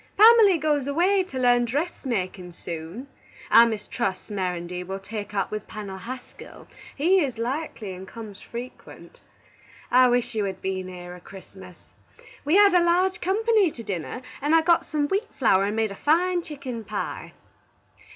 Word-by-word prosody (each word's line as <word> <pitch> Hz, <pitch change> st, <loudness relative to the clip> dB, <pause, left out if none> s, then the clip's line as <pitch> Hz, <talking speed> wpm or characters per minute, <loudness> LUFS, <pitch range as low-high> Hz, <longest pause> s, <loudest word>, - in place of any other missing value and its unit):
Pamely 435 Hz, -4 st, +7 dB
goes 295 Hz, -3 st, 0 dB
away 360 Hz, +7 st, +2 dB
to 315 Hz, -8 st, -8 dB
learn 245 Hz, -1 st, +4 dB
dressmakin 235 Hz, -, -3 dB
soon. 170 Hz, +10 st, -7 dB, 0.5 s
I 235 Hz, +1 st, +8 dB
mistrust 215 Hz, -2 st, -3 dB
Mirandy 180 Hz, -2 st, -3 dB
will 190 Hz, +2 st, -5 dB
take 205 Hz, +1 st, -7 dB
up 195 Hz, -, -1 dB
with 215 Hz, -1 st, -5 dB
Pennel 200 Hz, -3 st, -7 dB
Haskell; 250 Hz, +5 st, -10 dB, 0.3 s
he 355 Hz, +7 st, +3 dB
is 255 Hz, -5 st, -3 dB
likely, 235 Hz, -4 st, -4 dB
and 185 Hz, +1 st, -10 dB
comes 215 Hz, -3 st, -10 dB
frequent. 240 Hz, +2 st, -10 dB, 0.7 s
I 255 Hz, +1 st, +6 dB
wish 245 Hz, -1 st, +1 dB
you 215 Hz, -2 st, -1 dB
had 190 Hz, -1 st, -4 dB
been 190 Hz, -1 st, -3 dB
here 180 Hz, -1 st, -9 dB
a 180 Hz, -, -12 dB
Christmas. 185 Hz, -1 st, -13 dB, 0.7 s
We 300 Hz, +5 st, +2 dB
had 405 Hz, -1 st, +6 dB
a 355 Hz, -1 st, +5 dB
large 360 Hz, +2 st, +2 dB
company 425 Hz, 0 st, +2 dB
to 235 Hz, -6 st, -10 dB
dinner, 200 Hz, +5 st, -5 dB, 0.2 s
and 295 Hz, +3 st, +3 dB
I 325 Hz, -, +5 dB
got 340 Hz, 0 st, +3 dB
some 295 Hz, -2 st, 0 dB
wheat 395 Hz, +7 st, -2 dB
flower 195 Hz, -6 st, +3 dB
and 205 Hz, +1 st, -2 dB
made 220 Hz, -2 st, 0 dB
a -, -, -7 dB
fine 350 Hz, -, +2 dB
chicken 265 Hz, -8 st, -7 dB
pye. -, -, -5 dB
240 Hz, 160 wpm, -25 LUFS, 195-320 Hz, 0.7 s, I